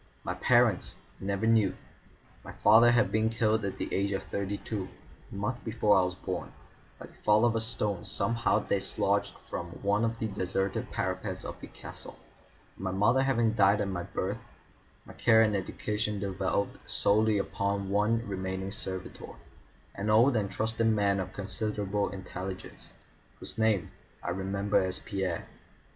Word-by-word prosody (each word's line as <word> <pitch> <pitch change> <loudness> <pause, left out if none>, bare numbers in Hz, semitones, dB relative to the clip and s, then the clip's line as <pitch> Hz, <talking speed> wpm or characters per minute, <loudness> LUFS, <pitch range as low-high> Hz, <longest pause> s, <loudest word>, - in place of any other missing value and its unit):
My - - -2
parents - - +3 0.3
I - - -6
never 100 +2 -1
knew. 110 -4 +3 0.7
My - - -9
father 115 +3 +6
had 120 0 +3
been 110 +1 +2
killed 110 -1 +1
at 100 - -3
the - - -4
age 100 +1 +1
of 95 - -2
thirty 100 0 -3
two, 100 -4 -4 0.4
a - - -8
month 110 +5 -3
before 110 -2 +3
I 95 - +6
was 90 0 -1
born, 90 -1 -5 0.4
by - - -9
the - - -17
fall 105 +2 +3
of 115 -1 +2
a 115 - +1
stone 105 -5 -1
somehow 115 -2 +1
dislodged 100 -1 0
from 85 - -4 0.2
one 100 +2 +2
of 115 0 0
the 110 - -2
deserted 95 -1 -2
parapets - - -3
of - - -6
the - - -7
castle, - - -10 0.6
and 95 - -8
my - - 0
mother 110 +7 +3
having 120 -5 +2
died 100 -1 +4
at 100 - 0
my 90 -2 -2
birth, 100 +6 -3 0.6
my - - -11
care 110 -1 +5
and 105 -2 +2
education 105 +2 -2
devolved 95 0 -1
solely 110 +1 +3
upon 100 0 -1
one 110 +3 +2
remaining 95 0 -3
servitor, 95 -3 -6 0.6
an 100 +2 -3
old 120 +5 +5
and 105 -3 +1
trusted 110 +2 0
man 100 -3 +2
of 95 - -4
considerable 105 0 -2
intelligence, 95 0 -7 0.5
whose - - -8
name 110 -6 +2 0.3
I 90 - -2
remember 100 +2 0
as 95 -1 -1
Pierre. 95 -4 -3
100 Hz, 165 wpm, -30 LUFS, 95-110 Hz, 0.7 s, father